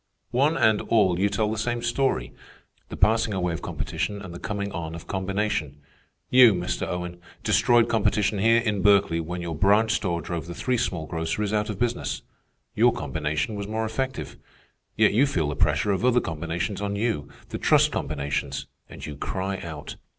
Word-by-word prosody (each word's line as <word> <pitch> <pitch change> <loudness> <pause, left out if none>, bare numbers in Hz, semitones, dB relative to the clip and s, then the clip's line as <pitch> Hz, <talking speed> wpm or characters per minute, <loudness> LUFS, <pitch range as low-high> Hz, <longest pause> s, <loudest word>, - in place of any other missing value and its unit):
"One 145 +6 +2
and 110 -1 +3
all 95 -6 +2
you 100 +1 +3
tell 105 +1 0
the 110 - -2
same 120 +1 -1
story,—the 120 - -4
passing 110 -1 +2
away 90 -2 0
of 80 - -5
competition 105 -1 -3
and 90 -4 -8
the 85 - -8
coming 100 -2 -3
on 80 -2 -5
of 85 - -9
combination. 95 -6 -2 0.5
You, 125 -5 +8
Mr. 90 0 -2
Owen, 90 -1 -5 0.2
destroyed 120 -1 +4
competition 105 -2 +1
here 115 +3 +5
in 105 -4 -1
Berkeley 100 -4 +4
when 85 +2 -4
your 85 -1 -3
branch 100 +7 +3
store 90 -6 0
drove 85 -1 -5
the 85 - -7
three 125 -1 0
small 90 -9 -2
groceries 80 +6 -2
out 105 0 0
of 105 - -3
business. 120 +2 -2 0.5
Your - - +4
combination 75 +5 -2
was 100 -1 -4
more 110 +1 -2
effective. 130 +4 -4 0.6
Yet - - +4
you 130 +7 +4
feel 80 - 0
the 75 - -3
pressure 80 +5 +2
of 95 +3 -1
other 125 -1 +4
combinations 85 +3 -3
on 100 0 -2
you, 100 -9 -1 0.2
the - - -5
trust - - +4
combinations, 70 -1 -3 0.2
and - - -9
you 75 - -6
cry 95 +6 -3
out. 80 -5 -7
100 Hz, 180 wpm, -25 LUFS, 85-110 Hz, 0.6 s, You